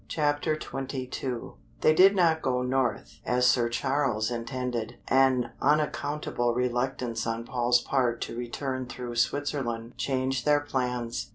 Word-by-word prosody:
CHAPTER 150 0 0
XXII 130 -2 -4 0.3
They 155 - +5
did 190 +5 +6
not 165 -4 +3
go 125 -1 0
north, 125 -3 -1
as 125 0 +2
Sir 120 -1 +4
Charles 125 -3 0
intended, 120 -1 -3
an 130 -2 +3
unaccountable 145 -4 0
reluctance 125 -2 -1
on 115 0 -2
Paul's 120 0 +2
part 125 -4 0
to - - -4
return 130 +2 -4
through 120 -1 -6
Switzerland 120 -3 -1
changed 130 -1 0
their 145 -1 +3
plans. 125 -4 -2
125 Hz, 125 wpm, -28 LUFS, 120-135 Hz, 0.3 s, did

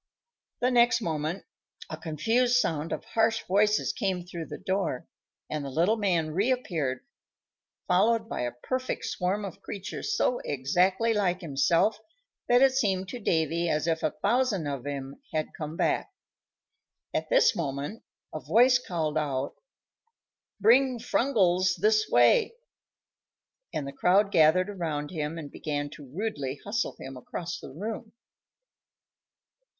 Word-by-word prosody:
The 250 +1 +2
next 240 -1 +4
moment 160 0 -3 0.4
a - - -5
confused 225 +11 +1
sound 165 - 0
of - - -4
harsh 225 0 +1
voices 210 +3 +2
came 190 -5 -1
through 170 -2 -7
the - - -7
door, 190 -9 -2 0.4
and 150 -1 -3
the 140 - -5
little 170 +10 +2
man 175 -7 0
reappeared, 175 - -1 0.8
followed 220 +5 +3
by - - -4
a 120 0 -1
perfect 255 - -3
swarm 195 +3 -1
of 190 - -8
creatures 210 - -4
so 250 - +1
exactly 180 - +1
like 185 -3 0
himself 170 +7 +2 0.5
that 245 +2 +6
it 270 - +6
seemed 195 -8 0
to 245 - -6
Davy 165 -3 0
as 150 -1 0
if 165 -1 0
a - - +1
thousand 215 -5 +2
of 140 -2 -4
him 140 -1 -6
had 155 -1 -2
come 155 +1 -6
back. - - 0 1.0
At - - -2
this - - +4
moment 145 +6 -4 0.3
a 155 - -3
voice 240 - +4
called 155 -8 -2
out, 140 -2 -2 1.1
"Bring 250 +5 +4
Frungles 185 -7 +2
this 215 0 +2
way;" 120 - +4 1.2
and 145 - -3
the 140 - -6
crowd 200 +3 +3
gathered 165 +3 +5
around 155 -6 -3
him 155 -1 -3
and 150 -3 -7
began 145 -1 -3
to 145 -4 -12
rudely 145 -7 -3
hustle 215 +3 -1
him 135 0 -8
across 170 +7 -6
the - - -9
room. 215 - -6
180 Hz, 140 wpm, -28 LUFS, 150-220 Hz, 1.2 s, that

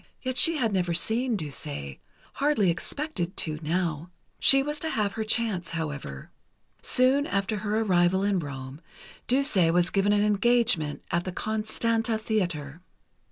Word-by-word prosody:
Yet 255 -1 -3
she 330 +4 +4
had 225 -6 0
never 180 -3 0
seen 230 +7 0
Duse... 145 - -5 0.4
hardly 270 -11 +2
expected 185 - -4
to, 155 -2 -2
now. 165 0 -2 0.3
She 270 0 +5
was 295 +1 -3
to 320 - -3
have 210 -7 -1
her 220 - -3
chance, 215 -5 -1
however. 145 - -5 0.5
Soon 265 +3 +4
after 200 +2 -1
her 210 +1 -1
arrival 185 -2 +2
in 200 -2 +1
Rome, 135 -1 -7 0.5
Duse 275 +1 +2 0.2
was 175 +1 +2
given 200 +1 +2
an 205 0 +3
engagement 210 -7 +2
at 170 0 0
the 185 - -3
Constanta 220 +2 -1
Theatre. 175 -9 -3
200 Hz, 145 wpm, -26 LUFS, 170-230 Hz, 0.5 s, She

